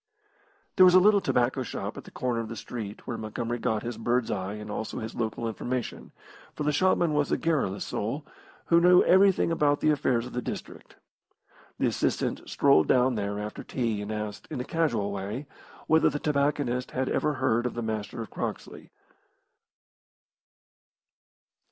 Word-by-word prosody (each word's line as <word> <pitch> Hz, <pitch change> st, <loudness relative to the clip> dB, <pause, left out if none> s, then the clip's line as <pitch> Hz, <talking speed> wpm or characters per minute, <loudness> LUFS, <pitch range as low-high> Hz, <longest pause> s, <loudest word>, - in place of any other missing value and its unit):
There 185 Hz, -, +8 dB
was 180 Hz, 0 st, +7 dB
a -, -, +9 dB
little 205 Hz, +1 st, +5 dB
tobacco 125 Hz, -3 st, +1 dB
shop 125 Hz, -, -5 dB
at -, -, -9 dB
the -, -, -11 dB
corner 125 Hz, -2 st, -2 dB
of 115 Hz, -1 st, -4 dB
the 115 Hz, -, -5 dB
street, 110 Hz, -2 st, -7 dB
where 120 Hz, -, -4 dB
Montgomery 115 Hz, +2 st, -3 dB
got 110 Hz, -1 st, -1 dB
his 120 Hz, -1 st, -5 dB
bird's 120 Hz, +1 st, 0 dB
eye 95 Hz, +2 st, -3 dB
and 105 Hz, 0 st, -7 dB
also 110 Hz, -, -4 dB
his 110 Hz, +1 st, -5 dB
local 115 Hz, 0 st, -2 dB
information, 120 Hz, +2 st, -4 dB, 0.4 s
for 150 Hz, -, -3 dB
the 150 Hz, -, +2 dB
shopman 170 Hz, 0 st, +2 dB
was 145 Hz, -1 st, +1 dB
a -, -, +2 dB
garrulous 145 Hz, -, 0 dB
soul, 125 Hz, +9 st, -3 dB, 0.4 s
who 170 Hz, 0 st, +4 dB
knew 180 Hz, +1 st, +7 dB
everything 190 Hz, -2 st, +4 dB
about 145 Hz, -3 st, +2 dB
the 155 Hz, -, +3 dB
affairs 125 Hz, -5 st, +1 dB
of 125 Hz, -, -9 dB
the 125 Hz, -, -2 dB
district. -, -, -7 dB, 0.8 s
The -, -, 0 dB
assistant -, -, -1 dB
strolled 80 Hz, -2 st, +4 dB
down 125 Hz, 0 st, +4 dB
there 100 Hz, -2 st, -2 dB
after 105 Hz, 0 st, -5 dB
tea 115 Hz, -5 st, -2 dB
and 105 Hz, +1 st, -5 dB
asked, 105 Hz, -1 st, -5 dB
in -, -, -4 dB
a 125 Hz, -, -3 dB
casual 120 Hz, -13 st, 0 dB
way, 100 Hz, +8 st, -4 dB, 0.4 s
whether 160 Hz, 0 st, +4 dB
the 145 Hz, -, -3 dB
tobacconist 140 Hz, -4 st, 0 dB
had 130 Hz, 0 st, -2 dB
ever 150 Hz, -, +1 dB
heard 125 Hz, -2 st, +1 dB
of -, -, -6 dB
the 120 Hz, -, -3 dB
Master 110 Hz, +1 st, -4 dB
of 110 Hz, -, -12 dB
Croxley. -, -, -6 dB
120 Hz, 175 wpm, -27 LUFS, 110-150 Hz, 0.8 s, a